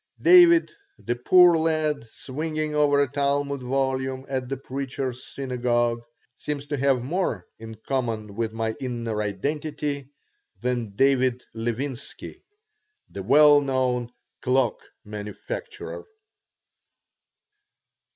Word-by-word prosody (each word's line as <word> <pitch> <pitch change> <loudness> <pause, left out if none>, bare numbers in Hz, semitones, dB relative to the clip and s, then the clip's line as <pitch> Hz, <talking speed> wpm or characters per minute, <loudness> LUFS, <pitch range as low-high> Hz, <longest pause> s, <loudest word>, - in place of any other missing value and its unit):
David, 345 -1 +7 0.3
the 120 - -3
poor 175 +8 +6
lad 155 -4 0
swinging 155 +6 -4
over 145 -1 +3
a - - -1
Talmud 140 0 -1
volume 130 0 -1
at 130 -2 -3
the 135 - -2
Preacher's 130 -1 -4
Synagogue, 120 -3 -1 0.3
seems 145 0 -4
to 145 0 -3
have 135 -2 +2
more 135 - -2
in 110 0 -9
common 115 -6 -2
with 110 +1 -2
my 110 0 -2
inner 115 -4 -3
identity 140 +6 -3 0.5
than 120 -5 -2
David 130 0 +2
Levinsky, 120 +4 -5 0.7
the 100 - -6
well 145 +7 +6
known 130 -3 0 0.3
cloak 125 -2 +1 0.3
manufacturer. 415 - -7
130 Hz, 100 wpm, -25 LUFS, 120-145 Hz, 0.7 s, David